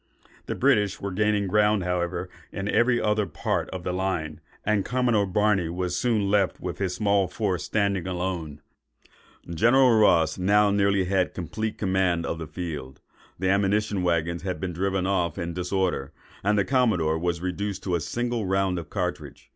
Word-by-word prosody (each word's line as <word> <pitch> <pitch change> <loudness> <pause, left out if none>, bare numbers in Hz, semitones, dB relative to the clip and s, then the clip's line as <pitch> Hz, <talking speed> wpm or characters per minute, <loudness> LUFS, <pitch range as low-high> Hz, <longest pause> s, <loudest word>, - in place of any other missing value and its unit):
The - - -2
British 100 -2 +2
were 100 - -4
gaining 105 +1 +1
ground, 105 +1 +2
however, 90 -1 -2 0.2
in 100 +1 -4
every 120 +3 +3
other 105 -1 +1
part - - -2
of 95 -2 -6
the 90 - -2
line; 85 -5 -2 0.2
and 105 -2 +2
Commodore 120 -4 +1
Barney 95 -2 +1
was 90 +1 -2
soon 110 -1 +1
left 100 -3 +2
with 90 - -5
his 95 -2 -1
small 100 -2 +2
force 95 -2 -2
standing 100 -4 0
alone. 90 -5 -4 0.9
General 120 +8 +4
Ross 85 -7 +4
had 90 - -5
now 105 +1 +4
nearly 100 -1 +2 0.3
complete 110 +5 -4
command 95 -4 +1
of 85 - -3
the 80 - -6
field; 75 -5 -6 0.4
the 95 +1 0
ammunition 100 0 +1
waggons 85 -1 0
had 90 -3 -4
been 90 +2 -3
driven 95 +1 -1
off 90 -4 0
in 85 -2 -3
the 90 +1 -4
disorder, 90 -7 -1 0.3
and 105 +2 +2
the 100 - +2
commodore 105 - +2
was 85 0 -1
reduced 95 +2 -3
to 90 - -2
a 85 - +2
single 120 +3 -2
round 95 -1 +1
of 80 - -9
cartridge. - - -4
95 Hz, 170 wpm, -25 LUFS, 90-105 Hz, 0.9 s, General